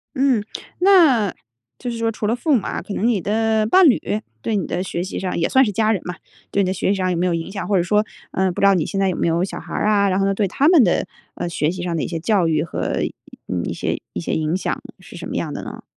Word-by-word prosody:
嗯， 260 -5 +2 0.4
那 320 - +5 0.5
就 250 - -4
是 235 - -4
说 230 0 0
除 215 -1 -3
了 225 - +1
父 300 +5 0
母 225 - +2
啊， - - -3
可 205 - -7
能 220 - 0
你 235 -4 +2
的 220 +3 +1
伴 350 - +6
侣 245 - +3 0.4
对 220 - -1
你 195 -5 -1
的 180 - -2
学 175 -2 -3
习 190 - -5
上 185 -2 -3
也 165 - +1
算 265 0 +5
是 210 - -1
家 215 +2 +2
人 200 -5 0
嘛， 180 - -4 0.4
对 200 - +2
你 - - 0
的 185 - 0
学 190 - -1
习 200 - +3
上 185 -1 0
有 175 - -1
没 175 - +1
有 180 - +1
影 165 +2 -3
响 195 -3 -5
或 200 - +1
者 175 - +2
说， 210 +4 +2 0.3
呃， 190 0 +1
不 175 - -5
知 - - +5
道 195 - +5
你 165 -4 0
现 195 - -3
在 195 - +2
有 180 - -2
没 - - 0
有 170 +1 +1
小 190 - -4
孩 - - -10
儿 - - 0
啊， 200 -2 +3
然 190 0 +1
后 195 - +2
呢， 195 - +2
对 205 0 +1
他 275 +9 +1
们 330 -6 +7
的， 175 - +1 0.3
呃， 175 - -3
学 155 -2 0
习 185 0 -6
上 175 -1 -2
的 - - -1
一 - - -2
些 165 -1 -4
教 185 0 +2
育 155 -2 +1
和， 165 - -6 0.7
呃， - - -3
一 - - -3
些 - - -2
一 - - -3
些 - - -3
影 155 +1 0
响 185 - -2 0.2
是 - - -13
什 - - -6
么 - - -5
样 - - -2
的 - - -5
呢？ - - -8
195 Hz, 325 characters per minute, -21 LUFS, 175-225 Hz, 0.7 s, 们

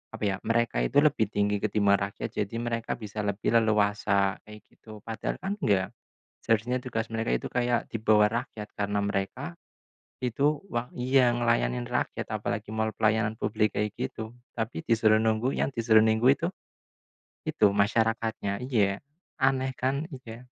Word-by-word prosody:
apa - - -7
ya, 95 - 0
mereka 115 - +1
itu 145 - +3
lebih 145 -6 +3
tinggi 105 0 +1
ketimbang 100 -1 +3
rakyat. 100 0 -4
Jadi 105 +2 -2
mereka 115 -1 -2
bisa 105 -2 -7
lebih 100 0 -1
leluasa 105 -2 +2
kayak 105 0 -11
gitu, 110 -2 -13
padahal 115 -1 -3
kan 195 +1 -1
enggak 95 - +2 0.6
seharusnya 115 +3 +1
tugas 115 -3 -2
mereka 115 +1 -1
itu - - -9
kayak 120 -1 +1
di - - -2
bawah 105 -1 +5
rakyat 105 -3 -9
karena 105 0 -1
mereka 100 - -3 0.7
itu 140 +5 +1
wang 120 +1 -2
iya 125 0 +4
ngelayanin 60 - +1
rakyat - - -2
apalagi 105 +1 -3
mall 110 0 0
pelayanan 110 0 +1
publik 105 -1 0
kayak 105 0 0
gitu. 120 -2 -5 0.2
Tapi 110 -7 -3
disuruh 110 -2 +4
nunggu, 110 +3 +1
yang - - 0
disuruh 110 -2 +5
nunggu 110 +2 +3 1.2
itu 105 - +3
masyarakatnya 110 0 0
iya. 105 -6 +1 0.4
Aneh 130 0 +2
kan 135 +4 0 0.2
iya. 115 0 -10
110 Hz, 150 wpm, -28 LUFS, 105-120 Hz, 1.2 s, bawah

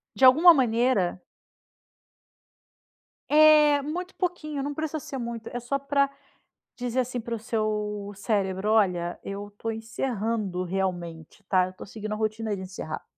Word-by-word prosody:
De 265 - +5
alguma 320 +7 +9
maneira 235 - +1 2.1
É, 300 -1 +6
muito 355 +6 -5
pouquinho, 305 -6 -3
não 290 - -3
precisa 315 +1 -3
ser 275 - -7
muito. 235 -2 -5
É 245 - -2
só 245 +3 -1
pra 280 0 +1 0.7
dizer, 245 0 -2
assim, 250 0 -1
para 235 0 -5
o - - -6
seu 210 -2 -2
cérebro: 195 -1 -1
"Olha, 180 -5 +1
eu 200 +1 -6
tô 225 - -3
encerrando 225 -4 -2
realmente, 175 -1 -4
tá? 185 -2 +4
Eu 185 - -10
tô - - -10
seguindo 215 +1 -7
a - - -1
rotina 215 0 -2
de 190 - -7
encerrar". 185 -4 -6
225 Hz, 145 wpm, -26 LUFS, 200-275 Hz, 2.1 s, alguma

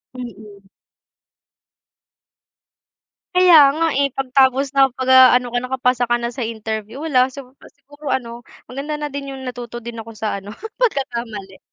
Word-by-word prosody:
Mm. 210 -5 -10 2.7
Kaya 360 -2 +6 0.2
nga 330 +1 +1
eh, 280 - +3
'pag 270 -1 -3
tapos 265 +1 +3
nakapag-ano 260 -2 +5
ka 245 - +1
nakapasa 250 -1 0
ka 240 - +3
na 235 0 -3
sa 240 -1 -4
interview 220 +4 -6
wala 260 -5 +3
sig 275 +1 -10 0.3
siguro 290 +1 -14
ano 235 -2 -4 0.3
maganda 280 +4 -5
na 295 -1 -5
din 275 0 -6
yung 265 - -9
natuto 240 -2 -7
din 235 -1 -7
ako 225 +1 -9
sa 215 -1 -3
ano 200 +1 -11 0.3
pagkakamali. 235 - -3
255 Hz, 140 wpm, -19 LUFS, 230-275 Hz, 2.7 s, Kaya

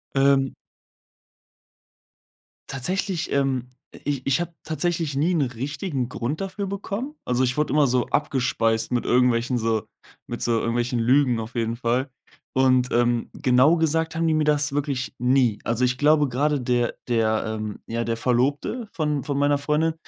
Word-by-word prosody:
Ähm 135 -1 +3 2.2
tatsächlich, 180 +6 -2
ähm, 130 -3 0 0.3
i - - -12
ich 140 -3 -1
ich 135 +5 +2
habe 175 -1 -5
tatsächlich 165 -2 -1
nie 155 +6 +2
'n 160 - +2
richtigen 135 +2 -3
Grund 125 +9 -3
dafür 195 +1 -4
bekommen. 200 +8 -4
Also, 125 +1 0
ich 125 - -1
wurde 150 - +1
immer 150 -2 +4
so 125 -1 +1
abgespeist 115 -5 0
mit 120 - 0
irgendwelchen, 125 0 +2
so 110 -2 0 0.4
mit 120 - -5
so 120 - +1
irgendwelchen 120 +1 -1
Lügen 125 0 +3
auf 110 +3 -7
jeden 115 0 -1
Fall. 125 +3 0 0.4
Und, 130 -1 +3
ähm, 120 -1 +1
genau 140 +4 +4
gesagt 160 0 0
haben 165 0 +1
die 160 - +3
mir 155 0 +2
das 150 -1 +1
wirklich 140 -3 -2
nie. 125 -3 +2
Also, 115 +2 +1
ich 125 0 0
glaube, 150 +1 +4
grade 145 +3 0
der 120 -1 0
der, 110 -2 +1
ähm 110 -1 -4
ja, 115 +1 -2
der 115 0 -2
Verlobte 140 - 0
von 150 -4 -1
von 140 -1 -2
meiner 145 0 +3
Freundin, 150 +3 0
130 Hz, 160 wpm, -24 LUFS, 120-150 Hz, 2.2 s, immer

